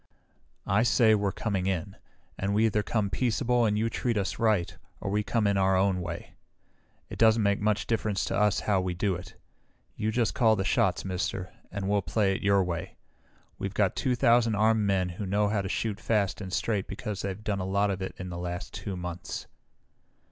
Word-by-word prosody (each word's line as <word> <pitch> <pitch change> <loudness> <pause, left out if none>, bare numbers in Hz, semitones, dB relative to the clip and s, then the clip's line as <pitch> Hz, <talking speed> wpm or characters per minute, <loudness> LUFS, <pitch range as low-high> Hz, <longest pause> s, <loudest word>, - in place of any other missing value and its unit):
"I 100 +1 +2
say 120 -2 +4
we're 100 -2 +1
coming 95 -3 -2
in, 95 +1 -2 0.4
and 100 +1 -1
we 110 +2 +4
either 105 -1 +2
come 105 -2 -1
peaceable 120 +2 +1
and 105 -1 +1
you 110 +2 +1
treat 115 0 -1
us 95 -3 -2
right 105 -6 +1 0.2
or 95 - -4
we 105 +1 +2
come 110 +1 0
in 100 -1 +2
our 95 0 +3
own 95 -1 +2
way. 85 -1 -6 0.8
It - - -8
doesn't 110 -1 +5
make 100 0 +2
much 105 -2 +1
difference 105 -3 0
to - - -2
us 105 -2 +2
how 100 -3 +1
we 90 -1 -2
do 100 +2 0
it. 90 0 -8 0.6
You 110 - -1
just 115 0 +1
call 110 -2 +4
the 95 - -1
shots, 95 -1 +1
Mister, 95 0 -3 0.2
and 100 -1 -3
we'll 100 0 +2
play 100 0 +1
it - - -5
your 100 -1 +3
way. 90 +1 -4 0.6
We've 100 0 -4
got 100 -3 +2
two 130 -2 0
thousand 115 -3 +4
armed 110 +1 +3
men 95 -2 +1
who 90 +4 -5
know 105 +2 +2
how 105 -1 +1
to 95 - -4
shoot 105 0 -2
fast 105 -3 0
and 95 -2 -6
straight 100 0 -1
because 105 -2 -5
they've 100 +1 -4
done 105 -2 -1
a - - -2
lot 100 +2 +1
of 95 0 -4
it 95 - -4
the 90 -1 -6
last 90 0 -5
two 95 -2 -5
months. 90 0 -5
100 Hz, 205 wpm, -28 LUFS, 95-110 Hz, 0.8 s, doesn't